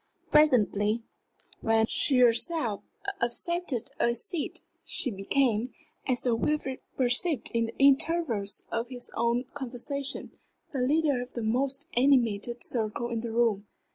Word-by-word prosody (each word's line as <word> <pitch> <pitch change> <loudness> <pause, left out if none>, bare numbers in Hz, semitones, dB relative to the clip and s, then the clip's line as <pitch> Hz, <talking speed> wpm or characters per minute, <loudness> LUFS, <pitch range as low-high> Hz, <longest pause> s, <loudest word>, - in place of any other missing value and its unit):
Presently, 230 -7 +3 0.6
when 225 0 +2
she 265 +4 +2
herself 240 - +2 0.4
accepted 260 +2 -1
a 235 0 +2
seat, 300 +6 -3 0.2
she 255 - 0
became, 225 +3 0 0.4
as 255 -2 +1
Sir 245 - +2
Wilfrid 265 +2 -1 0.2
perceived 255 +3 +2
in 230 -1 +1
the 230 - -10
intervals 275 -7 +3
of 230 +1 -2
his 250 -1 -5
own 235 +2 0
conversation, 275 +1 -4 0.4
the 275 - -3
leader 285 0 +2
of 250 +1 -9
the 235 - -4
most 265 +5 -1
animated 240 -3 +2
circle 235 0 0
in 230 -1 -2
the 235 -1 -5
room. 225 -3 +1
245 Hz, 130 wpm, -28 LUFS, 230-275 Hz, 0.6 s, Presently